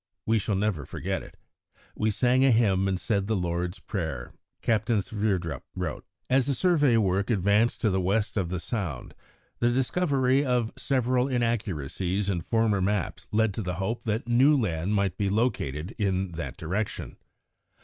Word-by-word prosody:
We 110 0 +3
shall 105 0 -1
never 95 -6 0
forget - - -3
it. - - -13 0.6
We 110 - +1
sang 125 +5 +3
a 135 - +5
hymn 100 -5 +3
and 95 -1 0
said 100 -3 0
the 110 - +1
Lord's 90 0 -2
Prayer," 80 - -4 0.3
Captain 110 0 +2
Sverdrup 95 -8 -2
wrote. - - -4 0.2
As 130 0 +3
the 140 - +1
survey 150 -9 +3
work 100 0 +1
advanced 105 +2 +2
to 110 -5 +2
the 95 0 +1
west 100 +3 0
of 95 -5 0
the 90 0 -2
Sound, 90 - -4 0.5
the 120 - +3
discovery 135 0 +2
of 125 -4 0
several 130 -1 +1
inaccuracies 100 - -1
in 90 -3 -2
former 110 +1 +1
maps 100 -1 -1
led 110 -1 +2
to 110 - -3
the 90 -3 -3
hope 100 +6 -3
that 110 +2 -1
new 130 +5 +5
land 95 -2 -1
might 100 -3 0
be 100 -1 +1
located 95 - -1
in 95 -2 0
that 85 0 -6
direction. 100 +4 -3
105 Hz, 165 wpm, -27 LUFS, 95-120 Hz, 0.6 s, a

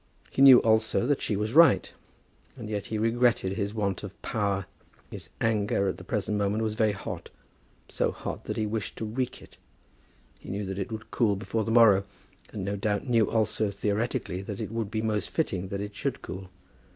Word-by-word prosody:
He - - -1
knew 135 -2 +10
also 110 +1 +2
that 145 +1 +1
she 105 - -1
was 105 +3 -2
right; 145 - +5 0.6
and 110 -3 -7
yet 105 -2 -3
he 110 - -3
regretted 115 -3 +2
his 100 0 -2
want 100 -3 -1
of 100 -1 -9
power. 100 -4 -1 0.5
His - - -8
anger 105 -3 +1
at - - -5
the - - -9
present 105 -1 -1
moment 100 +2 0
was 110 -1 -1
very 110 -1 +2
hot, 95 - -7 0.6
so - - 0
hot - - -6
that - - -4
he 110 - 0
wished 105 0 -3
to 110 - -3
wreak 125 +4 -3
it. - - -17 0.8
He - - -12
knew 100 +1 -3
that 95 +1 -4
it 100 - -4
would 110 +1 -7
cool 110 -5 +2
before 110 +2 -2
the 115 - -4
morrow; 110 -4 +6 0.5
and, 95 - -5
no 100 +1 -2
doubt, 105 +2 -1
knew 115 -3 +3
also 110 -1 +1
theoretically, 100 -2 -2
that 100 0 -6
it - - -4
would 115 -3 -2
be 110 0 -2
most 105 -3 -1
fitting 95 - -1
that 100 +1 -4
it 105 0 -6
should - - -3
cool. 95 0 -7
105 Hz, 200 wpm, -28 LUFS, 100-115 Hz, 0.8 s, knew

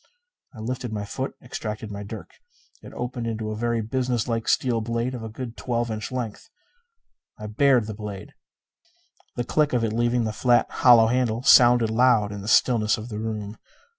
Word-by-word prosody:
I - - -10
lifted 125 +1 -4
my 105 -1 -4
foot; 130 +6 -5
extracted 110 -3 -6
my 100 0 -6
dirk. 105 +2 -8 0.5
It - - -12
opened 125 -1 -4
into 110 -1 -3
a - - -4
very 115 +1 -1
businesslike 120 -1 -2
steel 120 -3 +1
blade 115 +3 -2
of 125 - -6
a 110 - -6
good 115 +1 -7
twelve 120 -2 -2
inch 110 +1 -5
length. 125 - -5 0.9
I 105 - -8
bared 125 +2 +3
the 110 - -6
blade. 105 -2 -8 1.0
The 120 - -1
click 150 +3 +1
of 120 -2 +1
it 110 -1 -1
leaving 120 +1 +1
the 110 -1 -2
flat, 120 +1 +3
hollow 120 -3 +6
handle 120 0 0
sounded 120 -4 +6
loud 115 -3 +3
in 100 -1 -6
the 100 - -8
stillness 110 -1 +3
of 110 +2 -8
the 105 -2 -5
room. 110 -1 -5
115 Hz, 180 wpm, -24 LUFS, 110-125 Hz, 1.0 s, hollow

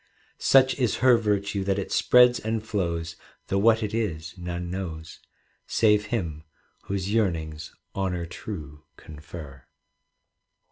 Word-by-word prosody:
Such 130 0 +4
is 125 -4 +1
her 125 -2 +8
virtue 100 -3 0
that 100 0 +1
it 100 - -4
spreads 125 0 +5
and 110 0 -3
flows, 85 -6 -2 0.3
Though 95 - +1
what 110 +2 +4
it 105 - -3
is 85 -8 -3
none 90 -1 -5
knows. 80 -4 -6 0.5
Save 105 -2 +3
him 85 -9 -3 0.4
whose 100 +1 -2
yearnings 80 -8 -1 0.2
honour 90 -3 -1
true 75 -5 -8 0.2
confer. 75 -3 -11
95 Hz, 125 wpm, -26 LUFS, 80-110 Hz, 0.5 s, her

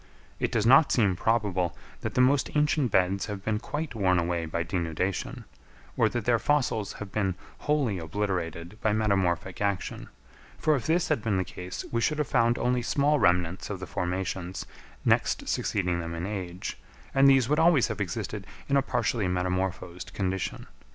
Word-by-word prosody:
It - - 0
does 110 -2 +1
not 135 +5 +7
seem 100 -6 +3
probable 95 -5 0 0.2
that - - -4
the 125 - +4
most 135 +1 +3
ancient 150 -3 +2
beds 95 0 +2
have 100 -2 -6
been 105 -1 0
quite 150 +5 -4
worn 95 -5 +2
away 85 -1 0
by 85 +2 -1
denudation, 85 +1 -2 0.5
or - - +3
that 120 -3 -3
their 120 -2 +3
fossils 125 -8 +1
have 105 -2 -8
been 95 -3 0 0.2
wholly 135 -10 0
obliterated 85 +1 -3
by 110 -3 +2
metamorphic 95 -4 0
action, 100 -2 -2 0.5
for 155 -1 +2
if 135 - -3
this 170 +2 +2
had - - +1
been 105 -3 0
the 95 - +1
case 90 +1 -7
we 115 - 0
should 150 +5 +1
have 150 - 0
found 120 -1 +3
only 125 0 +1
small 145 +5 +2
remnants 90 -1 +2
of 100 -3 -4
the 95 - -5
formations 90 0 -3 0.4
next - - +2
succeeding 90 -3 0
them 85 0 -4
in 85 +1 -3
age, 95 -3 -5 0.3
and 135 0 +6
these 135 -3 +5
would 150 +3 +2
always 160 -7 +5
have 105 -2 -3
existed 90 -4 -4 0.2
in 140 - +3
a - - +4
partially 120 -5 0
metamorphosed 90 -1 -2
condition. 95 -2 -2
100 Hz, 175 wpm, -28 LUFS, 90-125 Hz, 0.5 s, not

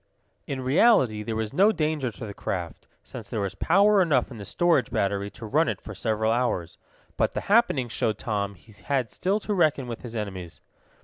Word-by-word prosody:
In 135 -2 -3
reality 130 - +4
there 110 +1 -4
was 110 -1 -3
no 200 +4 +5
danger 155 - -1
to 115 - -8
the 100 - -7
craft, 90 -3 -5 0.2
since - - -9
there 110 - -3
was 100 -1 -2
power 195 - +4
enough 140 -8 +2
in 120 - -8
the 100 - -7
storage 175 - +2
battery 100 -4 -1
to 115 +2 -10
run 155 +10 +2
it - - -3
for 105 - -9
several 110 +2 0
hours. 115 -8 -1 0.4
But - - +1
the - - -2
happening 200 - +2
showed 110 -2 -1
Tom 100 -4 -2
he 105 +5 -19
had 130 -6 0
still 195 +4 0
to 210 - -2
reckon 155 -7 +2
with 115 -2 -6
his 120 -2 -8
enemies. 95 -5 -5
120 Hz, 200 wpm, -26 LUFS, 105-155 Hz, 0.4 s, no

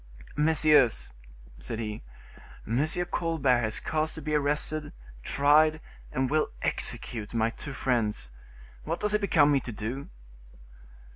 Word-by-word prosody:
"Messieurs," 150 - +3 0.5
said - - -5
he, 105 -2 -4 0.6
"M. 120 +6 +1 0.3
Colbert 150 -7 +2
has 110 -2 -1
caused 155 0 -1
to 160 - -6
be 155 - -2
arrested, 150 +1 -1 0.3
tried 150 - +4 0.3
and 130 0 0
will 155 +3 +1
execute 110 -1 -3
my 115 0 +2
two 135 +4 -8
friends; 110 - -1 0.5
what - - -3
does 210 0 +2
it 210 - +2
become 155 -7 +4
me 140 - +4
to 120 - -7
do?" 115 +6 -5
140 Hz, 130 wpm, -28 LUFS, 115-155 Hz, 0.6 s, tried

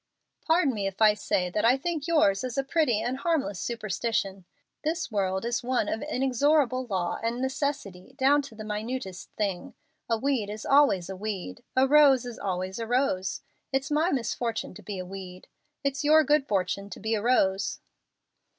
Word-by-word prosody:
"Pardon 320 -4 +3
me 200 -3 -2
if 195 -1 -6
I 215 -1 +6
say 180 -3 -1
that 210 - -1
I 245 +3 +5
think 315 +1 -3
yours 255 -12 +3
is 255 -1 -4
a 275 - +2
pretty 270 -7 +1
and 250 +2 -2
harmless 280 - 0
superstition. 210 -3 -2 0.4
This 315 -2 -2
world 190 0 -1
is 235 0 -1
one 245 -3 0
of 220 - -2
inexorable 265 -1 +1
law 185 -5 -2
and 230 +2 -2
necessity 265 -6 -3
down 280 +2 +4
to 275 -5 -11
the 215 - -7
minutest 215 -2 -5
thing. 195 -4 -3 0.3
A 230 - +2
weed 250 -4 0
is 215 +1 -6
always 220 -11 +4
a 190 - -6
weed. 190 - -5
A 260 +1 +4
rose 275 -3 +6
is 240 -2 -7
always 185 +1 -3
a 230 - -4
rose. 240 -7 0 0.3
It's 270 +2 -1
my 310 +4 +2
misfortune 235 - -2
to - - -12
be 205 -2 -6
a 185 - -5
weed. 185 -1 -9 0.4
It's 280 +2 -1
your 310 +2 +6
good 295 -2 +2
fortune 200 0 -1
to 185 - -8
be 220 +2 -2
a 215 - 0
rose." 200 -5 +1
230 Hz, 180 wpm, -27 LUFS, 195-275 Hz, 0.4 s, I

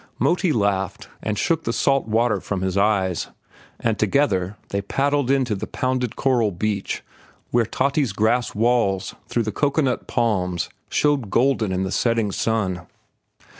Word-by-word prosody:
Moti 180 0 +2
laughed 100 - -1
and 105 -1 -2
shook 165 +6 +1
the - - -1
salt 135 +1 +1
water 110 -1 +2
from 95 0 -3
his 95 -1 -1
eyes, 100 -3 +1 0.5
and 110 -2 0
together 105 -5 +1
they 100 - -1
paddled 140 +5 0
in 135 -1 +3
to 115 - -2
the 95 - -4
pounded 130 -2 -1
coral 125 -5 +2
beach 100 +2 -2 0.5
where 120 -2 +2
Tati's 140 0 +1
grass 110 +5 +1
walls 105 -4 +1
through 120 - 0
the 110 - -2
cocoanut 140 +2 0
palms 90 -7 0 0.2
showed 145 -7 +1
golden 120 -2 +2
in 95 0 0
the 95 - -3
setting 115 -4 +1
sun. 95 -5 -1
110 Hz, 150 wpm, -22 LUFS, 100-130 Hz, 0.5 s, in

